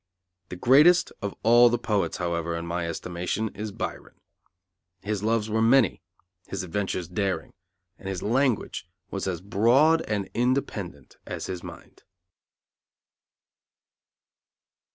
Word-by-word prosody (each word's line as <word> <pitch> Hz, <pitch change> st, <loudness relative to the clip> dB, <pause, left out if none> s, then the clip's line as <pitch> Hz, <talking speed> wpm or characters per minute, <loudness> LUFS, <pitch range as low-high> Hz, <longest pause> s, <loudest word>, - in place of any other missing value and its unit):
The -, -, -6 dB
greatest 150 Hz, -, +5 dB
of 100 Hz, -1 st, -4 dB
all 120 Hz, +2 st, +7 dB
the 120 Hz, -, +1 dB
poets, 110 Hz, -4 st, -1 dB
however, 85 Hz, -1 st, -2 dB
in 85 Hz, 0 st, -4 dB
my 85 Hz, 0 st, -2 dB
estimation, 90 Hz, +6 st, -3 dB
is 105 Hz, +1 st, -6 dB
Byron. -, -, -6 dB, 0.8 s
His 105 Hz, -1 st, -2 dB
loves 110 Hz, 0 st, +1 dB
were 110 Hz, +1 st, 0 dB
many, 115 Hz, -2 st, +4 dB, 0.5 s
his 95 Hz, -2 st, -4 dB
adventures 90 Hz, -1 st, -3 dB
daring, 95 Hz, -2 st, -2 dB, 0.5 s
and 95 Hz, -, -6 dB
his 95 Hz, -2 st, -4 dB
language 120 Hz, -5 st, 0 dB, 0.2 s
was 100 Hz, -1 st, -3 dB
as 90 Hz, -2 st, -3 dB
broad 125 Hz, -, +4 dB
and 105 Hz, -2 st, -1 dB
independent 110 Hz, -, -2 dB
as -, -, -5 dB
his 90 Hz, -2 st, -5 dB
mind. -, -, -12 dB
100 Hz, 120 wpm, -26 LUFS, 90-115 Hz, 0.8 s, all